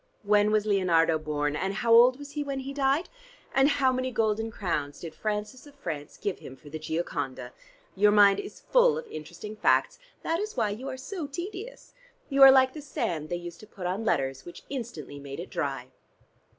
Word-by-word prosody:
When 205 0 +4
was 215 -1 +2
Leonardo 170 -6 +3
born? 150 -1 -2
And 190 +5 -2
how 230 +2 +2
old 245 +2 +7
was 285 0 -10
he 295 0 -3
when 275 -1 -4
he 275 +1 -6
died? 275 +4 +1 0.5
And 270 +1 +4
how 265 -3 +2
many 255 0 -1
golden 225 -1 0
crowns 150 -9 -3
did 165 -2 -7
Francis 215 +6 -4
of 285 - -16
France 155 - -6
give 200 -3 -3
him 130 - -10
for 145 +2 -15
the 155 - -5
'Gioconda'? 145 -6 -4 0.4
Your 205 +2 +5
mind 205 -1 +6
is 400 0 -8
full - - +4
of 475 - -5
interesting 175 - -8
facts. 215 - +2 0.2
That 330 +1 0
is 425 +2 -4
why 210 - +1
you 245 +6 -5
are 260 - -5
so 325 +3 -5
tedious. 385 - -7 0.4
You 275 -1 +1
are 270 0 +12
like 260 -1 +5
the 305 - -7
sand 165 - -3
they 175 - -1
used 175 -1 -8
to 215 - -13
put 190 -3 -9
on 185 +5 -2
letters, 135 -9 0
which 175 - -11
instantly 240 - -6
made 140 +1 -8
it 175 - -7
dry." 135 -4 -3
210 Hz, 205 wpm, -28 LUFS, 165-270 Hz, 0.5 s, are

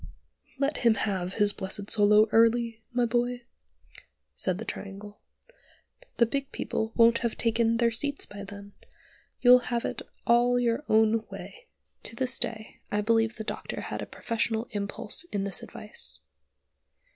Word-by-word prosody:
"Let 280 +2 0
him 230 -2 +4
have 190 -4 -2
his 205 -1 +5
blessed 200 +1 -4
solo 210 +1 +5
early, 230 0 +3
my 245 0 +1
boy," 245 +1 -1 0.9
said 120 - -1
the 225 - -6
Triangle. 205 0 -7 1.0
"The 235 - +5
big 275 +3 -3
people 220 0 -3
won't 230 0 +5
have 235 -2 -2
taken 230 0 +2
their 235 0 +3
seats 285 +5 -1
by 200 0 -9
then. 200 0 -10 0.7
You'll 250 0 +8
have 235 -1 -1
it - - -3 0.2
all 245 +1 +4
your 235 +3 0
own 220 +1 +3
way." 480 0 -10 0.3
To - - -7
this 260 0 0
day 220 -1 -2
I 210 - +1
believe 225 +1 +2
the 220 - -6
Doctor - - -5
had - - -5
a - - -6
professional 230 0 -2
impulse 205 +5 -3
in 205 - -3
this 195 -2 -2
advice. 70 0 -7
225 Hz, 150 wpm, -28 LUFS, 205-240 Hz, 1.0 s, You'll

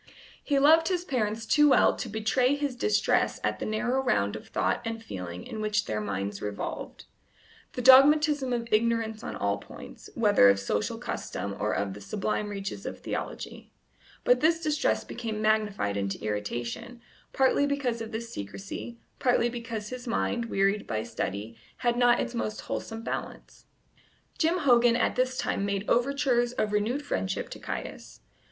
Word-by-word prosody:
He 285 - +1
loved 320 +4 +6
his 360 -2 -1
parents 225 -5 -1
too 295 +6 +5
well - - +5
to 240 - -5
betray 220 +6 +1
his 285 -1 -1
just 245 - -14
distress 425 - +2
at - - -1
the - - -3
narrow 245 +5 0
round 105 - +1
of 110 - -9
thought - - 0
and 225 -1 -4
feeling 90 - -6
in 215 - -6
which 210 -1 0
their 105 0 -2
minds 100 -1 -3
revolved 105 -1 -5 0.7
the 250 - -4
dogmatism 285 +1 +6
of 235 -1 -1
ignorance 225 0 +1
on - - -5
all - - -1
points, - - -12
whether 205 - +5
of 100 0 +3
social 105 +1 -1
custom 100 +1 -4
or 105 - 0
of 100 -1 -2
the 105 - -10
sublime 210 - -2
reaches 200 -1 -5
of - - -6
theology; - - -6 0.5
but - - +4
this 325 +1 +3
distress 305 -2 +1
became 225 -3 -5
magnified 215 - +1
into 100 -1 -2
irritation, 115 - -4 0.3
partly 270 +1 +3
because 265 -5 -1
of 225 0 -6
this 230 +1 -5
secrecy, 195 - -7 0.2
partly 245 -2 +3
because 230 -3 -5
his 255 0 -7
mind, 235 0 0
wearied 200 -1 +1
by 110 -1 -2
study, 105 +3 -4 0.2
had 240 -1 +1
not 245 0 +4
its 245 - -2
most 215 -2 -3
wholesome 225 0 -5
balance. - - -6 0.7
Jim 335 +1 +2
Hogan 245 -6 +4
at 240 - +1
this 255 0 0
time - - -1
made 200 0 -2
overtures 245 -1 +2
of 215 -3 -1
renewed 230 +8 0
friendship 190 -9 -2
to - - -8
Caius. - - -7
230 Hz, 165 wpm, -28 LUFS, 195-255 Hz, 0.7 s, loved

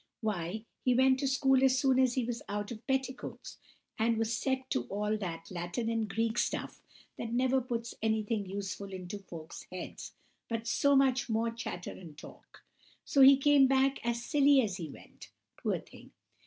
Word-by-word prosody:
Why, 210 0 -3 0.2
he 250 -1 +3
went 260 +1 +4
to 275 - 0
school 265 0 +3
as 265 -1 +4
soon 260 0 +3
as 255 -2 +3
he 255 -3 0
was 235 0 -4
out 205 +1 -3
of 235 +2 -9
petticoats, 265 -1 -3 0.4
and 225 +1 +2
was 225 +1 0
set 260 +1 -1
to 120 - 0
all 210 +8 -1
that 170 -5 -6
Latin 175 +6 -3
and 225 -2 -1
Greek 225 +3 0
stuff - - -2 0.4
that 230 - -4
never 260 +2 +2
puts 235 -2 -4
anything 220 -1 0
useful 195 0 -5
into 185 +2 -6
folks' 170 -4 -10
heads, 185 -1 -7 0.4
but 230 -1 -3
so 280 +4 +3
much 265 -2 +3
more 225 +1 +1
chatter 230 -6 -6
and 160 -5 -11
talk; - - -14 0.4
so 275 - +3
he 270 +1 +9
came 280 -1 +5
back 270 +1 +2
as 235 0 -2
silly 285 -2 +5
as 195 -4 -2
he 165 -5 -6
went, - - -13 0.3
poor - - -1
thing! - - -14
230 Hz, 180 wpm, -31 LUFS, 205-265 Hz, 0.4 s, he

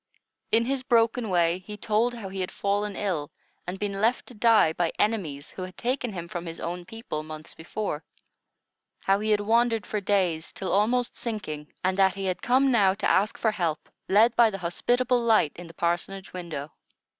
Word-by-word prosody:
In 230 +1 +4
his 270 +1 0
broken 230 -2 +2
way, 175 -1 +2
he 210 +3 -9
told 225 +4 +1
how 220 -4 -6
he 190 0 -6
had 180 - -2
fallen 205 0 -1
ill, 170 -8 -2 0.4
and 180 +2 -4
been 200 -1 -3
left 230 +3 +2
to - - -11
die 220 -7 +4
by 170 0 0
enemies 170 -10 -1
who - - -8
had 185 0 -7
taken 250 -1 -1
him 170 -3 -6
from 170 0 -5
his 165 - -6
own 175 +1 -4
people, 225 -7 -5
months 155 0 -8
before; 165 -1 -4 1.0
how 195 +1 +2
he 215 +1 -2
had 210 -1 +3
wandered 225 0 +2
for 210 - -2
days 185 -5 0
till 190 - -4
almost 235 +5 +2
sinking; 170 -10 -5
and 185 +1 +1
that 190 -1 +4
he 195 0 -4
had 185 -1 -2
come 265 +2 +3
now 195 -5 +4
to 205 - -1
ask 205 +4 +2
for 220 - +2
help, 170 -7 -2 0.2
led 220 +5 +5
by 235 -2 +6
the 195 - -5
hospitable 245 +8 +1
light 220 -10 +4
in 175 0 -10
the 165 - -12
parsonage 175 +3 -2
window. 160 -5 -5
200 Hz, 195 wpm, -26 LUFS, 175-225 Hz, 1.0 s, by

